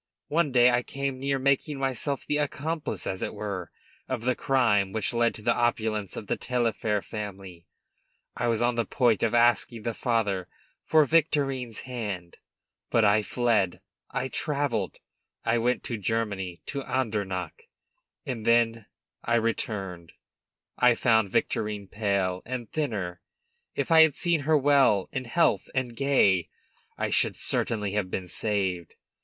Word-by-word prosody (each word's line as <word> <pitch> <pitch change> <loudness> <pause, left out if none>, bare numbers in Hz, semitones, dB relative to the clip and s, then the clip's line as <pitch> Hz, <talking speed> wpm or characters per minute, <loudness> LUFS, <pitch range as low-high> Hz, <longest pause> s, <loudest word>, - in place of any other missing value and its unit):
One 160 -2 +1
day 125 -1 +6
I 120 0 +2
came 135 +1 -4
near 135 +1 0
making 140 +2 +1
myself 135 +1 -1
the 150 - 0
accomplice, 150 +2 -3
as 95 - -3
it - - -3
were, 100 -5 -5 0.4
of 125 -3 -3
the 130 +1 +2
crime 115 -7 +2
which 110 +1 -1
led 115 0 +2
to 105 - -9
the - - +3
opulence 110 -4 -1
of - - -6
the - - -1
Taillefer 115 -4 -1
family. 95 -5 -8 0.7
I 120 - -1
was 115 0 +1
on 120 +1 +2
the 115 -1 0
point 120 -5 +2
of 115 0 +1
asking 120 -1 +3
the 115 - -2
father 105 -7 0 0.4
for 155 -1 +4
Victorine's 135 -6 +1
hand. 105 -9 -5 0.5
But 115 -2 +3
I 105 +1 +4
fled; 110 -5 +1 0.3
I 130 - -2
travelled; 140 - -1 0.5
I 115 +1 +2
went 125 +2 0
to 115 -3 -4
Germany, 100 -4 -2
to 140 - -4
Andernach; 115 - -3 0.6
and 125 -6 -4
then 115 -1 +2 0.4
I 120 - +1
returned! 100 -7 -2 0.7
I 125 -1 +5
found 110 -4 +3
Victorine 105 +1 -1
pale, 100 -3 -1
and 120 -3 -6
thinner; 100 - -3 0.5
if - - -2
I 160 0 +8
had 160 -3 +5
seen 170 -2 +2
her 155 +2 +3
well 135 -8 +3
in 130 -1 -3
health 165 +8 +1
and 125 -2 -1
gay, 105 -11 +3 0.5
I - - -2
should - - +2
certainly 105 -3 -1
have 100 -2 -1
been 90 -1 -4
saved. 95 -4 -1
115 Hz, 150 wpm, -27 LUFS, 105-130 Hz, 0.7 s, I